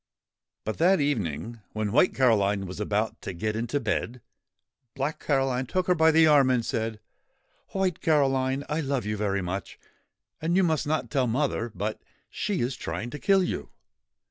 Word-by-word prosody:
But 110 - -4
that 180 +3 +4
evening, 115 - -2
when 110 -1 -2
White 150 - +3
Caroline 105 -6 +3
was 90 +2 -7
about 105 +1 -1
to - - -5
get 105 +5 -2
into 120 +5 -1
bed, 125 -2 -2 0.8
Black 140 +3 -2
Caroline 135 -3 0
took 185 +5 0
her 180 - +4
by 160 -2 +4
the 160 0 +6
arm 145 -4 +5
and 125 -3 +1
said: 110 -1 -2 0.7
'White 190 -4 -1
Caroline, 135 -4 +2
I 155 +2 -1
love 135 -6 -1
you 105 0 -1
very 100 -2 -1
much; 95 +2 -5 0.6
and 165 +2 0
you 190 - +4
must 160 -4 +1
not 145 -6 -1
tell 130 -3 +2
mother; 120 -1 -1
but 105 +4 -3 0.3
she 205 -3 -2
is 125 +2 -1
trying 90 +9 -5
to 150 - -6
kill 195 -1 +4
you. - - -3
130 Hz, 170 wpm, -27 LUFS, 110-150 Hz, 0.8 s, the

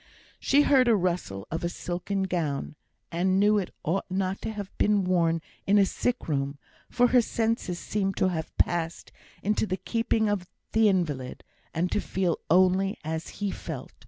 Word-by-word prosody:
She 290 +1 +4
heard 265 -4 +4
a 230 - +5
rustle 175 - -2
of 165 +1 -3
a 170 - 0
silken 180 +3 -3
gown, 155 -6 -2 0.4
and 185 +3 +2
knew 210 +1 +4
it 190 - -3
ought 180 +6 -1
not 190 +1 -1
to - - -3
have 205 -3 -7
been 205 -1 +3
worn 165 -3 +2 0.2
in 200 +1 +5
a 200 - +6
sick 245 +5 -2
room; 140 -2 -1 0.3
for 245 0 +3
her 250 0 +6
senses 225 -5 -1
seemed 195 +1 -2
to 185 - +3
have 160 -3 -4
passed 170 -1 0 0.3
into 210 +2 +1
the 185 - -1
keeping 225 +3 0
of 200 -4 -1 0.2
the 220 -1 +5
invalid, 150 -9 -1 0.3
and 175 +2 -1
to 210 - +1
feel 185 -3 -1
only 185 +2 +4
as 160 +2 -3 0.2
he 200 - +1
felt. - - -7
185 Hz, 175 wpm, -27 LUFS, 170-205 Hz, 0.4 s, a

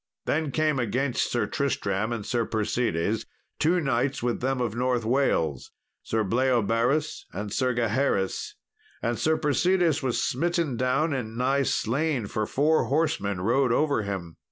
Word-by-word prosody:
Then 155 -1 0
came 155 +1 +1
against 125 +2 0
Sir 120 -3 +1
Tristram 110 -4 -1
and 115 -3 -3
Sir 120 -1 0
Persides, 110 -2 -1 0.3
two 170 +4 +3
knights 135 -3 0
with 120 -1 -1
them 130 +1 0
of 120 -4 -1
North 125 -1 0
Wales, 95 - +1 0.3
Sir 110 0 -1
Bleoberis 125 +6 +1
and 105 +2 -5
Sir 130 -2 +1
Gaheris; 115 -4 0 0.5
and 120 0 -1
Sir 160 0 +2
Persides 165 +2 +2
was 130 -3 0
smitten 170 0 0
down 130 +6 +1
and 115 -4 -4
nigh 135 +3 +2
slain, 135 0 0
for 105 +1 -2
four 155 +3 +2
horsemen 140 - 0
rode 125 +5 +2
over 145 -1 +2
him. 95 -5 -5
125 Hz, 145 wpm, -26 LUFS, 110-140 Hz, 0.5 s, two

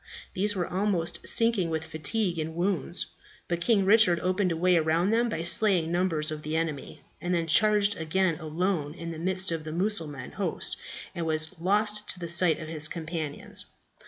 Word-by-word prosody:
These 205 +2 +1
were 180 -2 0
almost 185 -2 -1
sinking 230 -7 +2
with 160 0 -2
fatigue 170 +3 -2
and 160 +1 -4
wounds; 180 0 0 0.4
but 170 0 -2
King 200 0 +3
Richard 200 -4 +5
opened 185 0 +1
a 165 - -1
way 180 +2 +3
around 165 +4 +2
them 235 +1 +2
by 165 - -3
slaying 175 -2 +2
numbers 170 -4 +1
of 155 -1 -5
the 155 +1 -4
enemy, 160 -3 -3 0.2
and 175 +1 0
then 165 -1 0
charged 205 +4 +4
again 165 +1 0
alone 160 -1 -2
into 170 -2 -6
the - - -7
midst 185 0 +1
of 165 -2 -3
the 155 - -6
Mussulman 165 -7 -3
host, - - 0 0.4
and 170 -1 -3
was 155 +1 +1
lost 210 +4 +1
to 185 - -3
the 170 -1 -5
sight 170 -1 +3
of 155 - -7
his 155 -1 -1
companions. 160 -3 -5
170 Hz, 185 wpm, -28 LUFS, 160-190 Hz, 0.4 s, Richard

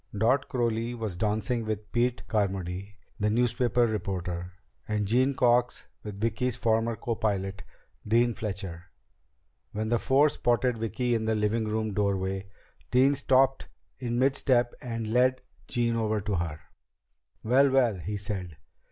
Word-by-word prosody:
Dot 130 +6 +2
Crowley 120 -1 -1
was 110 -6 -4
dancing 110 +4 -1
with 110 -1 -4
Pete 120 +1 0
Carmody, 95 -1 -2 0.2
the 105 +1 +1
newspaper 120 +1 +2
reporter, 90 -5 -3 0.3
and 105 -1 0
Jean 130 +6 +2
Cox 120 0 +2 0.2
with 105 -2 -8
Vicki's 115 +3 0
former 115 0 +1
copilot, 100 -5 -2 0.5
Dean 120 +2 +3
Fletcher. 95 -6 -5 0.9
When 110 +1 -2
the 120 0 +2
four 140 +3 +4
spotted 120 -2 +1
Vicki 120 +2 -1
in 110 -1 0
the 110 0 +1
living 110 +1 0
room 110 -1 -1
doorway, 95 -1 -1 0.4
Dean 130 +3 +4
stopped 135 -1 +2 0.3
in 120 -2 -2
mid 135 +2 +3
step 120 -3 +2
and 115 -2 -4
led 130 +1 +3 0.3
Jean 120 -1 0
over 110 -1 0
to 105 0 -3
her. 80 -2 -3 0.8
"Well, 135 +5 +4
well," 125 -7 +2
he 100 +6 -4
said. 95 -5 -5
110 Hz, 140 wpm, -28 LUFS, 100-120 Hz, 0.9 s, four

